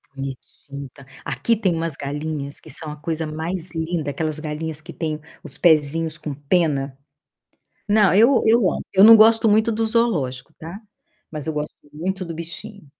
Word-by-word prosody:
bonitinho, 135 +1 -8
tá. 140 - -16 0.2
Aqui 230 - 0
tem 195 -5 0
umas 165 -3 -2
galinhas 145 0 -4
que - - -15
são 155 +1 -1
a 150 - -7
coisa 160 +1 -4
mais 160 +3 -4
linda, 160 -2 -2
aquelas 155 +1 -3
galinhas 155 0 -4
que 170 +1 -11
têm 155 -1 -3 0.2
os 145 -4 +2
pezinhos 160 0 +3
com 155 -2 -6
pena. 145 -2 -1 0.9
Não, 205 -2 +4
eu 235 +6 +5
eu 225 +2 +5
amo. - - -5
Eu 195 +1 +6
não 225 0 +10
gosto 225 +1 +5
muito 220 +2 +3
do 225 +1 -1
zoológico, 165 - -1
tá. 170 +6 -9 0.5
Mas 155 -2 -6
eu 160 - -2
gosto 150 0 -5 0.2
muito 185 +5 -4
do 165 -2 -7
bichinho. 175 +3 -8
160 Hz, 170 wpm, -21 LUFS, 150-190 Hz, 0.9 s, não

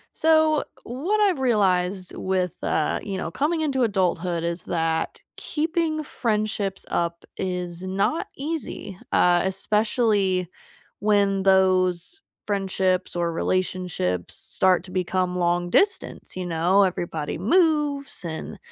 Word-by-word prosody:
So, 315 -1 +4 0.2
what 315 - -1
I've 385 -8 +3
realized 190 -6 +1
with, 185 -2 0
uh, 155 - 0
you 195 -2 -4
know, 165 - -4
coming 315 +3 0
into 270 -4 +1
adulthood 180 -5 0
is 170 +1 -3
that 165 -1 -1 0.2
keeping 320 0 -1
friendships 215 -6 -2
up 170 0 -1
is 180 -2 -3
not 195 - 0
easy- 280 - -5
uh, 175 -1 +4
especially 200 -2 +1 0.5
when 200 -2 +2
those 185 - +2 0.2
friendships 190 -3 0
or 170 -1 0
relationships 175 - -1
start 185 -2 +1
to 185 - -12
become 185 0 -1
long 175 0 +1
distance, 390 - 0
you 185 -1 -4
know. 175 +4 +3
Everybody 170 -5 -2
moves 290 - +1
and 160 -1 -5
190 Hz, 115 wpm, -24 LUFS, 180-245 Hz, 0.5 s, So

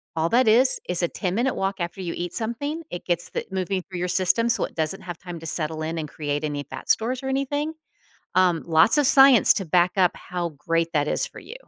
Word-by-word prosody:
All 160 0 +1
that 250 +4 +3
is 250 +4 +4
is 180 0 +1
a 175 - +1
10-minute 220 +8 -1
walk 195 +1 -1
after 175 +2 -4
you 175 -2 -4
eat 175 0 -5
something, 285 +8 -1
it 175 - -7
gets 175 -1 0
the - - -4
moving 190 0 -2
through 180 0 -8
your 180 - -1
system 185 +6 +2
so 230 - +1
it - - -12
doesn't 160 +4 -1
have 175 -2 -7
time 175 -2 -9
to 165 - -11
settle 160 0 -2
in 160 +1 -3
and 155 -2 -4
create 145 0 -4
any 145 -1 -3
fat - - -9
stores 250 +4 +1
or 265 - -3
anything. 285 +3 -2 0.6
Um, 180 -3 +3
lots 165 - +4
of 290 - +3
science 270 -3 +7
to 195 - -2
back 175 +2 +2
up 185 -2 +4
how 175 -1 -4
great 165 +3 0
that 145 -1 +1
is - - +1
for - - -12
you. - - -10
180 Hz, 235 wpm, -24 LUFS, 165-230 Hz, 0.6 s, science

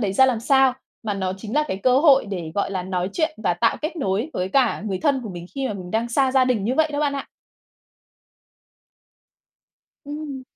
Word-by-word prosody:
đấy 200 -4 0
ra 265 +6 +5
làm 245 -4 0
sao, 265 +1 +4 0.3
mà 215 -3 -2
nó 190 -2 -2
chính 215 +5 -7
là 300 - +3
cái 190 - -2
cơ 250 +6 +3
hội 275 -5 +5
để, 180 -5 -5
gọi 200 - 0
là, 190 -2 -2
nói 180 0 -2
chuyện 315 -10 0
và 175 -2 +2
tạo 175 - +2
kết 315 +3 -3
nối 230 - -1
với 180 +1 -2
cả 245 -2 +2
người 190 -2 -2
thân 280 0 +1
của 215 - -6
mình 175 -1 -8
khi 270 -1 -2
mà 210 - -3
mình 180 -2 -8
đang 225 +3 0
xa 260 +2 +2
gia 260 -1 +5
đình 245 -6 0
như 245 +5 0
vậy 315 +1 +2
đó 290 - -1
bạn 290 -1 +1
ạ. 275 - -6 2.8
Ừm. 290 -2 -6
235 Hz, 220 wpm, -23 LUFS, 195-275 Hz, 2.8 s, ra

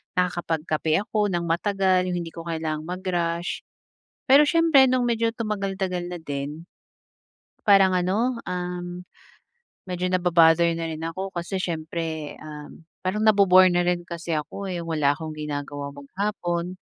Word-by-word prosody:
nakakapagkape 165 -2 0
ako 210 0 0
nang 175 -3 -1
matagal, 185 +1 +2
yung 180 - -1
hindi 165 - -7
ko 165 0 -9
kailangang 160 -2 -3
mag-rush. 175 -2 -2 0.6
Pero 285 +3 +8
siyempre 325 -3 +5
nung 255 0 +2
medyo 230 -1 +1
tumagal-tagal 195 -5 -2
na 175 0 -6
din, 145 +2 -5 1.0
Parang 195 -2 +6
ano, 210 +7 0
um, 180 0 -4 0.8
medyo 180 0 -2
naba-bother 170 -2 +4
na 165 - -3
rin 160 -1 -5
ako, 185 +4 -4
kasi 175 +3 -3
siyempre, 160 -3 -4
um, 150 +1 -10 0.2
parang 210 +4 -1
nabo-bore 185 -4 +6
na 175 - +2
rin 175 0 0
kasi 170 -2 -3
ako, 155 +6 -5
eh, 175 -2 -4
wala 150 -3 +1
akong 160 0 -6
ginagawa 145 -1 -5
maghapon. 175 +4 -3
175 Hz, 135 wpm, -24 LUFS, 160-190 Hz, 1.0 s, Pero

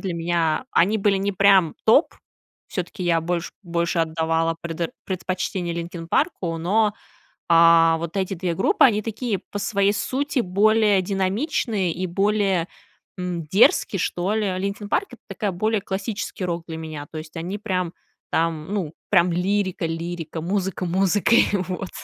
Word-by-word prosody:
для 185 -4 -3
меня 170 +3 0
они 200 +6 +3
были 200 -1 +2
не 195 +1 -1
прям 190 -4 +4
топ, 250 +9 +4 0.5
всё-таки 180 -1 -5
я 170 -2 +2
больше 170 +1 -2
больше 170 -1 -1
отдавала 165 0 0
предо 170 0 -3
предпочтение 180 -2 -3
"Линкин 170 0 -6
Парку", 175 - 0
но, 205 +5 +2 0.6
а, 165 -1 +6
вот 170 +3 -5
эти 190 0 -1
2 180 -1 -2
группы 405 - +3
они 215 -4 +3
такие 225 -2 -2
по 205 - -3
своей 200 -1 +1
сути 275 +5 -1
более 210 +1 +3
динамичные 195 - -1
и 185 +3 -3
более, 195 -1 +1 0.5
м, 180 -2 -3
дерзкие, 195 +2 +3
что 180 +3 -1
ли. 215 -1 0
Linkin 200 +2 -3
Park- 390 - +1
это - - -13
такой 210 -5 -2
более 215 +4 0
классический 200 +1 -4
рок 170 -1 -3
для 160 -1 -6
меня. 155 -2 -7
То 160 - -5
есть 155 +2 -10
они 175 +5 -4
прям 185 -5 -2 0.4
там, 165 +2 -1
ну, 175 -7 -2 0.2
прям 180 -3 +4
лирика 185 0 0
лирика, 165 0 -4
музыка 190 +1 -2
музыкой. 195 +5 +3 0.2
Вот. 185 0 -4
185 Hz, 150 wpm, -23 LUFS, 170-205 Hz, 0.6 s, а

